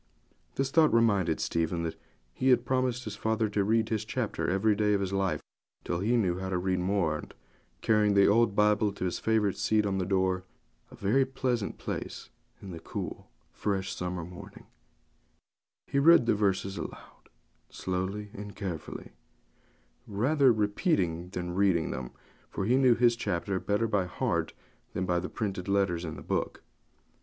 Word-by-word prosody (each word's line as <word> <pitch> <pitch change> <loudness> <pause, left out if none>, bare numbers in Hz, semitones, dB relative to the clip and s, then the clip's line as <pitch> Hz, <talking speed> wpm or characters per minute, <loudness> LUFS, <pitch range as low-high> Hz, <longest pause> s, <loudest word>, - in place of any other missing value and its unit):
This 135 0 -1
thought 155 0 +5
reminded 100 -8 +3
Stephen 85 +1 -1
that 80 - -3 0.4
he 130 - +1
had 125 -2 +4
promised 130 -1 0
his 110 -2 -6
father 110 +1 0
to 100 -1 +1
read 110 +2 +2
his 110 -2 -1
chapter 105 - -2
every 100 +4 +2
day 105 0 +2
of - - +1
his 95 -1 -2
life 95 -1 0 0.4
till 85 - -2
he 115 +6 +2
knew 90 -5 +1
how 95 0 -4
to 95 - 0
read 90 0 0
more; 90 -4 +1
and, - - -11 0.5
carrying 105 -2 +3
the 100 0 +6
old 110 -1 +3
Bible 105 0 +3
to 95 - -4
his 90 - -2
favourite 110 -3 +1
seat 110 -1 +2
on 95 -1 0
the 90 - 0
door 95 -1 +1 0.5
sill, - - -14
a - - -26
very 135 +3 +5
pleasant 125 -5 -2
place - - -6 0.3
in 95 - -7
the 85 - -7
cool, - - -6 0.2
fresh 95 -2 -2
summer 90 -2 -4
morning, 90 +1 -11 1.2
he 140 - 0
read 165 -3 +7
the - - +3
verses 100 -1 0
aloud, - - -10 0.4
slowly 95 +3 -3
and 105 0 -8
carefully, 90 -7 -6 1.0
rather 130 +6 +3
repeating 105 - 0
than 90 -1 -4
reading 95 -3 +2
them, 65 -2 -5 0.4
for 95 - -3
he 120 +5 +3
knew 130 -3 +5
his 120 0 +4
chapter 95 -3 -2
better 105 +4 0
by 100 -4 +1
heart 90 - -1 0.4
than 95 - -1
by 90 -1 +1
the 90 - -5
printed 95 -4 -4
letters 100 -4 +1
in 80 -2 -5
the - - -9
book. - - -2
100 Hz, 170 wpm, -29 LUFS, 90-110 Hz, 1.2 s, read